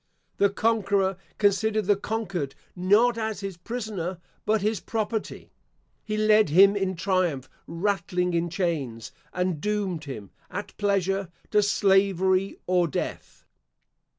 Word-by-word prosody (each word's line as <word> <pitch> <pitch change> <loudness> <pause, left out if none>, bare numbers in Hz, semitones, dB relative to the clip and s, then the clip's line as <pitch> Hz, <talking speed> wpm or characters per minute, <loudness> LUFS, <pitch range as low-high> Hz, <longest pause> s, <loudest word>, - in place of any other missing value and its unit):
The 200 - +4
conqueror 200 -2 +1 0.2
considered 215 +1 +2
the 205 +1 +4
conquered, 195 -9 -3 0.2
not 215 +6 +3
as 220 -2 -3
his 195 -2 -5
prisoner, 190 -3 -4 0.3
but 215 -1 +2
his 215 0 +1
property. 220 -1 -4 0.5
He 215 -1 -3
led 215 -3 +4
him 195 +6 +6
in 190 -2 -1
triumph 175 -7 0 0.2
rattling 180 0 -1
in 170 0 0
chains, 155 - -2 0.2
and 180 -4 -1
doomed 200 -7 -1
him, 110 -9 -7 0.2
at - - -6
pleasure, 195 -2 0 0.2
to 210 - +5
slavery 195 -1 +2
or 180 -1 +2
death. 145 - -5
195 Hz, 125 wpm, -26 LUFS, 175-210 Hz, 0.5 s, him